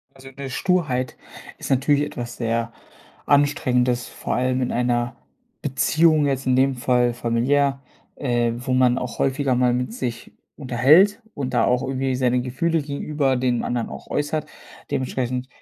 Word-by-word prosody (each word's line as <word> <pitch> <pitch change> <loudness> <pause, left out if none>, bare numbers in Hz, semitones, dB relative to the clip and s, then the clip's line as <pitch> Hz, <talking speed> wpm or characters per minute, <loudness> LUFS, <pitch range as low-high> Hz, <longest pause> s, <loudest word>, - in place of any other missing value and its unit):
Also, 135 0 -12
'ne 135 0 -6
Sturheit 140 -7 0 0.4
ist - - -7
natürlich 140 +2 +3
etwas 120 -4 -6
sehr 115 0 -1 0.5
anstrengendes, 125 -4 +2
vor - - -4
allem 130 +1 0
in 125 - -1
einer 120 0 0 0.5
Beziehung 155 +2 +3
jetzt 135 -1 -1
in 130 - +3
dem 135 +1 +3
Fall 125 -1 +1
familiär, 135 +4 +1 0.3
äh, 120 -3 0
wo 125 +1 -3
man 130 -1 +3
auch 125 - -5
häufiger 135 -1 +1
mal 125 -1 +2
mit 125 -2 -2
sich 120 -2 -5 0.2
unterhält 150 - +4
und 130 -3 -4
da - - +3
auch 125 +1 +2
irgendwie 130 -1 -1
seine 125 -1 +1
Gefühle 155 +6 -1
gegenüber 140 -1 -1
den 125 -1 0
anderen 120 -1 -2
auch - - -9
äußert. 145 +1 -2 0.4
Dementsprechend 125 -1 -2
130 Hz, 150 wpm, -22 LUFS, 125-140 Hz, 0.5 s, unterhält